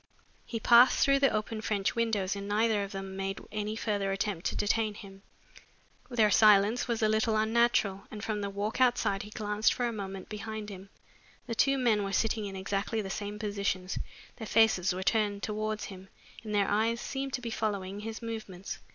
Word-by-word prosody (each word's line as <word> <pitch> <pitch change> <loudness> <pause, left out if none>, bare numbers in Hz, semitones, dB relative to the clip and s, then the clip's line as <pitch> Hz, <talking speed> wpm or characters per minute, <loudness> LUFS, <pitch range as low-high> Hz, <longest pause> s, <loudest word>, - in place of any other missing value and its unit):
He 230 - -3
passed 240 +3 +6
through 275 0 +4
the 275 -1 +5
open 215 +1 -2
French 205 -1 -1
windows 210 -5 0
and 200 0 -6
neither 215 0 +2
of 200 - -6
them 195 -1 -6
made 195 0 -3
any 210 0 -3
further 205 -3 -1
attempt 195 -3 -2
to - - -3
detain 215 0 0
him. 195 -2 -12 0.9
Their 225 -4 +3
silence 210 +3 +5
was 230 -2 -1
a - - +5
little 220 +1 +2
unnatural 220 -3 +2
and 210 -2 -8
from 210 -2 -2
the 200 - -2
walk 205 +5 -3
outside 240 -6 +2
he 210 - -9
glanced 210 0 0
for 245 - -1
a 235 - -1
moment 195 -3 -6
behind 215 0 -6
him. 195 0 -10 0.6
The 235 - -4
two 275 +4 +3
men 230 -5 +2
were 195 0 -3
sitting 220 +1 +1
in 195 - -7
exactly 200 +3 -2
the 195 - -5
same 205 0 -4
positions, 200 -3 -2 0.4
their 220 - -6
faces 220 -5 +4
were 185 +1 -3
turned 205 -1 +1
towards 215 0 -2
him, 190 -1 -10 0.3
and 210 -2 -4
their 200 -1 +3
eyes 225 +3 +1
seemed 270 +1 -4
to 245 - -2
be 235 -2 -4
following 200 -3 -2
his 225 +2 -6
movements. 215 -5 -6
210 Hz, 195 wpm, -30 LUFS, 200-225 Hz, 0.9 s, passed